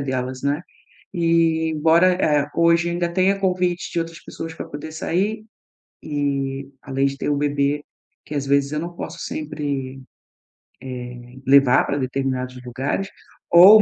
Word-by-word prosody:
delas, 130 -1 -3
né, 145 +4 0 0.5
e 165 -2 +2
embora, 165 +4 +4
eh, 150 -4 +2
hoje 170 0 +4
ainda 175 0 0
tenha 195 +2 +2
convites 180 -2 0
de 170 - 0
outras 165 0 -5
pessoas 165 0 -7
para - - -6
poder 150 +2 -7
sair 200 +7 -1 0.6
e 140 -2 -2
além 135 0 0
de 140 - -2
ter - - -1
o 145 - +2
bebê, 145 0 0 0.4
que 150 - -6
às 140 -1 -1
vezes 140 0 +2
eu 150 - -1
não 175 +1 -6
posso - - -7
sempre, 140 -3 -4 1.2
eh, 125 +1 -15
levar 135 -2 +6
para 140 - -1
determinados 130 -1 -2
lugares 135 +10 -2 0.4
ou 195 +5 +10
150 Hz, 150 wpm, -22 LUFS, 135-170 Hz, 1.2 s, ou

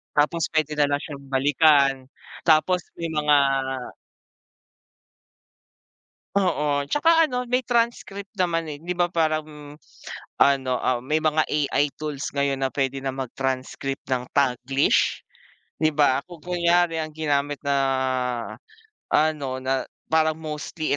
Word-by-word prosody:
Tapos 150 +3 +2
pwede 155 -1 +1
na 145 - +4
lang 145 0 -1
siyang 140 -3 -9
balikan. 140 +1 +4 0.5
Tapos 170 +3 +3
may 165 -1 -4
mga 150 -2 +3 3.0
Oo. 150 -7 +1
Tsaka 325 +1 +4
ano, 250 0 -2
may 250 +1 +1
transcript 230 -5 -2
naman, 170 -4 0
eh, 150 -1 -7
di 180 +1 -4
ba? 175 - +3
Parang 155 -3 -2 0.6
ano, 135 -2 +3
ah, 125 -1 0
may 155 +3 +1
mga 155 0 +2
AI 145 -1 0
tools 150 -3 -4
ngayon 140 -1 0
na 130 - -1
pwede 135 -1 -1
na 135 - -1
mag-transcript 135 +1 -4
ng 125 -1 -1
Taglish, 135 0 +2 0.6
di 155 -1 +1
ba? 140 -2 +2
Kung 175 -4 -13
kunyari, 175 -1 +2
ang 155 -1 -4
ginamit 145 -2 -1
na 140 -1 0 1.4
ano, 145 -4 +1
na 130 0 -1 0.2
parang 160 0 +3
mostly, 155 0 -5
150 Hz, 125 wpm, -24 LUFS, 140-165 Hz, 3.0 s, na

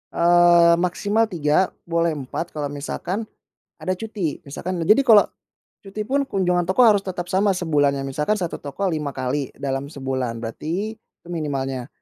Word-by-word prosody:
eee, 170 0 +5
maksimal 205 +5 +1
3, 170 -1 +2 0.2
boleh 170 -1 0
4 145 +5 -5
kalau 145 -2 -3
misalkan 180 +9 -4 0.5
ada 185 - -1
cuti. 200 -6 -4
Misalkan 170 +5 -4
jadi 215 +10 +5
kalau 215 -3 +8 0.6
cuti 200 +2 -5
pun 275 +5 0
kunjungan 180 -6 +1
toko 190 +7 +4
harus 215 -4 +6
tetap 180 -1 -4
sama 195 +1 +2
sebulannya, 145 -5 +1
misalkan 150 +9 -1
satu 180 -5 -3
toko 145 +6 -6
5 150 -4 -3
kali 130 +2 -2
dalam 135 0 -3
sebulan, 130 -5 -4
berarti 180 - -4
itu 195 - -26
minimalnya. 135 -6 -3
170 Hz, 150 wpm, -22 LUFS, 145-190 Hz, 0.6 s, kalau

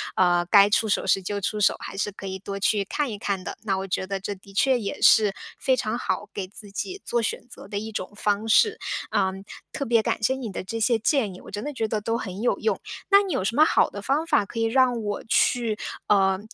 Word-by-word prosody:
呃， 175 -1 +3
该 200 +2 +6
出 220 +1 +2
手 - - 0
时 195 - +2
就 205 +2 -3
出 210 +2 -2
手， 205 - +4
还 - - -8
是 205 - -1
可 195 0 -9
以 190 0 -4
多 200 +1 -6
去 205 0 +2
看 290 +5 -2
一 210 - -5
看 200 -2 -2
的。 - - -6
那 195 -3 0
我 190 0 -4
觉 190 - -2
得 195 0 -3
这 200 +1 -4
的 195 +1 -17
确 255 +5 +3
也 200 -3 -5
是 210 -3 +6 0.2
非 260 - +2
常 235 -1 -2
好 190 -5 -3
给 190 -2 -4
自 205 0 -12
己 370 - -5
做 240 -1 0
选 225 - -3
择 - - -11
的 205 - -3
一 220 +1 -6
种 185 -2 -5
方 210 +1 0
式。 435 - +4 0.3
呃， 190 - +2 0.4
特 285 - -3
别 230 -1 +3
感 - - -1
谢 260 +5 +2
你 245 -5 -5
的 - - -5
这 225 +4 -5
些 225 0 +2
建 225 -5 +1
议， 180 - -12
我 - - -12
真 205 +1 -5
的 295 +1 -4
觉 225 -4 -1
得 215 0 -1
都 225 +2 -1
很 195 -3 -6
有 - - +1
用。 450 - 0 0.3
那 400 0 +6
你 380 - -3
有 - - 0
什 215 +4 -1
么 305 +3 +6
好 - - +3
的 205 - -8
方 280 +7 +1
法 205 - +3
可 230 - -6
以 225 - +2
让 245 0 +2
我 205 -1 -3
去， 225 0 +1 0.3
呃， 190 -2 +3
210 Hz, 275 characters per minute, -25 LUFS, 195-240 Hz, 0.4 s, 该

